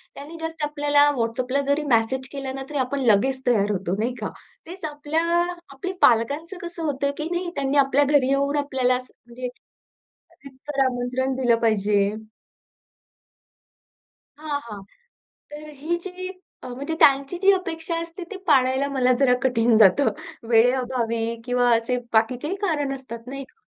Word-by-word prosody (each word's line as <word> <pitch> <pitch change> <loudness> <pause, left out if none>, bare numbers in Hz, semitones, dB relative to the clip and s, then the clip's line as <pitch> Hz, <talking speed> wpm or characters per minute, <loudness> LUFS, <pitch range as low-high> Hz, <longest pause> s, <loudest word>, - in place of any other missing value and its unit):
त्यांनी 310 +4 -9
जस्ट 325 -1 -5
आपल्याला 290 0 +3
WhatsAppला 250 +4 0
जरी 285 +2 +1
मेसेज 260 +4 -1
केला 270 -2 -5
ना, 270 - -5
तरी 300 - -4
आपण 260 +2 -1
लगेच 260 +6 +1
तयार 210 -4 +3
होतो, 190 -2 -2
नाही 235 +3 0
का? 215 - -2 0.4
तेच 360 -1 -7
आपल्या 295 +2 -2 0.5
आपली 365 +7 -5
पालकांचं 285 - +2
कसं 340 -1 -8
होतं 280 -2 -1
की 310 +2 -4
नाही, 350 0 -2
त्यांनी 275 +1 0
आपल्या 275 +2 +3
घरी 285 -2 +3
येऊन 280 +1 +1
आपल्याला 265 -3 +1
असं 255 0 -7
म्हणजे 245 +1 -6 1.0
रीतसर 275 +1 -7
आमंत्रण 255 +1 -1
दिलं 245 -3 +3
पाहिजे. 205 -2 +2 2.2
हां, 300 -2 -3
हां. 210 -5 -9 0.7
तर 300 +1 -9
अ, - - -10
ही 315 +5 -2
जी 370 0 -6 0.3
अ, - - -7
म्हणजे 280 +6 -4
त्यांची 275 +5 +4
जी 395 - +7
अपेक्षा 335 -2 -3
असते 335 +2 -8
ती 400 - -5
पाळायला 265 -1 +3
मला 255 -2 +2
जरा 265 -3 +4
कठीण 235 -3 +3
जातं. 220 +5 +5 0.4
वेळेअभावी 240 -1 +2 0.2
किंवा 245 -1 +2
असे 230 +2 -2 0.2
बाकीचेही 250 +10 +1
कारण 295 -8 0
असतात, 235 -3 -10
नाही 275 +1 -6
का? 445 - -31
270 Hz, 150 wpm, -23 LUFS, 245-295 Hz, 2.2 s, जी